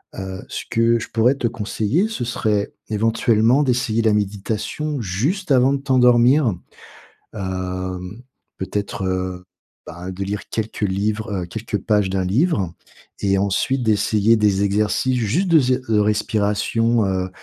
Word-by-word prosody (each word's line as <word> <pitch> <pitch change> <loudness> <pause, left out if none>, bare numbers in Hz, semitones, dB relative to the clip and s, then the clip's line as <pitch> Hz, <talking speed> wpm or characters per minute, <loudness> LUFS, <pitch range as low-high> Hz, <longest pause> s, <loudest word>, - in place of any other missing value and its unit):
Heu, 95 -1 -6
ce - - -5
que 115 0 +2
je - - -6
pourrais 115 +4 +3
te 120 - -1
conseiller, 115 - -1
ce 170 - -3
serait 105 -3 -1 0.2
éventuellement 115 +4 +2
d'essayer 120 -4 +1
la 110 -2 +3
méditation 105 +8 -2
juste 140 - -2
avant 130 0 +5
de - - +1
t'endormir. 125 -1 +4 0.8
Hem, 95 +1 -5 0.4
peut-être, 100 +1 -4
heu 95 -1 -2 0.4
bah, 90 +2 -7
de 95 +2 -4
lire 100 +1 -5
quelques 110 0 -4
livres, 105 +2 -1
heu, - - -5
quelques 110 +3 -4
pages 105 -1 +1
d'un 95 -1 -1
livre 100 - +1 0.5
et 95 -1 +1
ensuite 110 +7 0
d'essayer 110 +1 +3
des 100 -2 +2
exercices 105 +5 +1
juste 145 - 0
de 160 -2 +6
zai 125 -1 +1
de 110 -2 +2
respiration, 105 +2 +1
heu, 95 -1 -1
110 Hz, 140 wpm, -21 LUFS, 100-120 Hz, 0.8 s, de